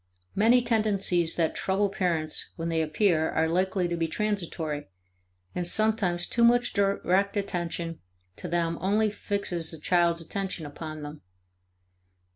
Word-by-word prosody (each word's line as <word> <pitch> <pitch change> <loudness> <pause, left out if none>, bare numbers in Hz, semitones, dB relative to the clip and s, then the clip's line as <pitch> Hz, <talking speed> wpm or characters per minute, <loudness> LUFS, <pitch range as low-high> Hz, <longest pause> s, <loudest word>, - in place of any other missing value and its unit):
Many 235 +4 +4
tendencies 200 -7 +2
that 165 -2 +1
trouble 195 +2 0
parents 170 -5 -1
when 165 0 -3
they 165 -1 +1
appear 160 +1 +1
are 160 0 +1
likely 185 +2 0
to 170 - -2
be 165 -1 -1
transitory, 165 -6 -3 0.7
and 175 -1 -1
sometimes 200 -4 +2
too 235 - 0
much 240 +1 +4
direct 200 0 +1
attention 175 -4 -3 0.4
to - - -6
them 170 -1 -1
only 210 +3 +2
fixes 185 -6 -1
a 160 - -7
child's 170 +1 +2
attention 185 0 -4
upon 155 +1 -7
them. 150 +1 -8
175 Hz, 135 wpm, -27 LUFS, 165-200 Hz, 0.7 s, Many